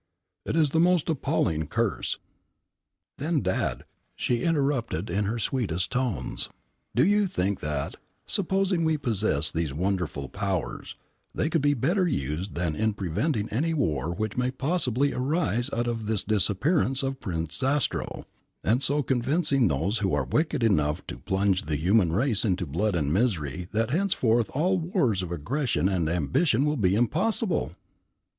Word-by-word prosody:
It - - -1
is 155 -4 +3
the 160 - +2
most 175 -1 +3
appalling 130 - 0
curse - - -1 0.5
" - - -60
"Then, 155 +1 0
Dad," 95 -1 -1 0.3
she 120 -1 0
interrupted 135 - 0
in 100 +3 0
her 110 +4 -1
sweetest 100 -7 -1
tones, 125 -4 -1 0.5
"do 125 - +5
you 205 +1 +3
think 95 - -1
that, 75 +3 -3 0.3
supposing 190 -2 +1
we 160 -1 +2
possess 100 - 0
these 80 -4 -2
wonderful 90 -5 -1
powers, 95 0 -3 0.4
they 155 - 0
could 165 - +2
be 145 0 +3
better 180 - +1
used 80 - -2
than 85 -3 -1
in 110 +6 +1
preventing 105 - -1
any 160 +8 0
war 80 - 0
which 110 +4 -3
may 125 0 +1
possibly 140 -1 0
arise 135 -2 0
out 120 +1 -1
of 115 -3 -3
this 110 -3 0
disappearance 130 - +1
of 135 0 -2
Prince 80 - -3
Zastrow, 135 +1 0 0.4
and 120 +4 +2
so 145 +1 +1
convincing 135 +1 +2
those 85 - 0
who 95 -6 +1
are 70 -3 0
wicked 150 - 0
enough 80 -6 +1
to - - -7
plunge 95 +4 +1
the 75 - -1
human 90 +3 +3
race 110 +4 +2
into 95 -5 0
blood 90 +7 0
and 75 -3 0
misery 90 - 0
that 115 +2 0
henceforth 130 - +2
all 180 +6 +2
wars 160 - +1
of 90 -2 -5
aggression 110 - 0
and 90 -5 0
ambition 90 - +2
will 150 0 +1
be 100 -7 +2
impossible?" 170 - 0
115 Hz, 155 wpm, -27 LUFS, 90-145 Hz, 0.5 s, do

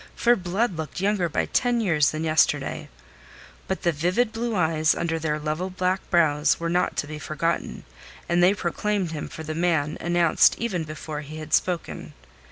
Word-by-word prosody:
For 240 0 +4
Blood 190 +1 -1
looked 160 +2 -5
younger 195 -3 +1
by - - 0
ten 245 -1 +1
years 165 -10 +3
than 155 +1 -4
yesterday. 155 -1 +1 0.8
But 190 - -3
the 170 - +3
vivid 180 +10 0
blue 230 0 -2
eyes 160 -3 +2
under 165 -1 -1
their 150 -1 -1
level 155 +4 -3
black 185 +1 -1
brows 155 -4 +3
were 170 0 -2
not 180 +1 +1
to - - 0
be 155 0 -7
forgotten, 165 +3 -2 0.4
and 175 +1 +2
they 185 +3 +5
proclaimed 195 0 -1
him 150 -2 -5
for 160 - -8
the 155 0 -4
man 160 -3 0
announced 175 -1 +4
even 190 -8 -2
before 155 0 -6
he 150 +1 -9
had 155 -1 -7
spoken. 180 -2 -1
170 Hz, 175 wpm, -24 LUFS, 155-185 Hz, 0.8 s, they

